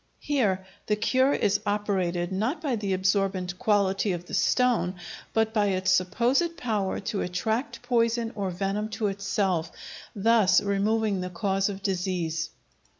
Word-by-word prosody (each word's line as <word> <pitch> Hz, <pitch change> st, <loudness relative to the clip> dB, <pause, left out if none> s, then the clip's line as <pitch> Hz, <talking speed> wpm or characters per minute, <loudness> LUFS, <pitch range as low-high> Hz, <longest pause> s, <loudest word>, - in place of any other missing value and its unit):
Here 205 Hz, -10 st, +1 dB, 0.2 s
the 210 Hz, -, +2 dB
cure 260 Hz, +5 st, +2 dB
is 205 Hz, -7 st, +2 dB
operated, 190 Hz, -4 st, -1 dB
not 220 Hz, -, -1 dB
by 285 Hz, -6 st, -1 dB
the 205 Hz, -3 st, -3 dB
absorbent 185 Hz, -1 st, 0 dB
quality 200 Hz, -1 st, +2 dB
of 175 Hz, 0 st, -5 dB
the -, -, -11 dB
stone, 245 Hz, -8 st, +2 dB, 0.4 s
but 220 Hz, 0 st, +1 dB
by 210 Hz, -2 st, +2 dB
its 185 Hz, -1 st, +1 dB
supposed 240 Hz, -, +2 dB
power 210 Hz, -6 st, -1 dB
to 200 Hz, 0 st, -2 dB
attract 220 Hz, +8 st, -2 dB
poison 230 Hz, -1 st, +1 dB
or 200 Hz, -3 st, -2 dB
venom 195 Hz, +4 st, -2 dB
to 220 Hz, -, -1 dB
itself, 195 Hz, -4 st, -1 dB, 0.4 s
thus 210 Hz, -3 st, +4 dB
removing 205 Hz, 0 st, 0 dB
the 180 Hz, -, -4 dB
cause 195 Hz, +1 st, 0 dB
of 195 Hz, -1 st, -7 dB
disease. 175 Hz, -4 st, -1 dB
200 Hz, 145 wpm, -27 LUFS, 185-220 Hz, 0.4 s, thus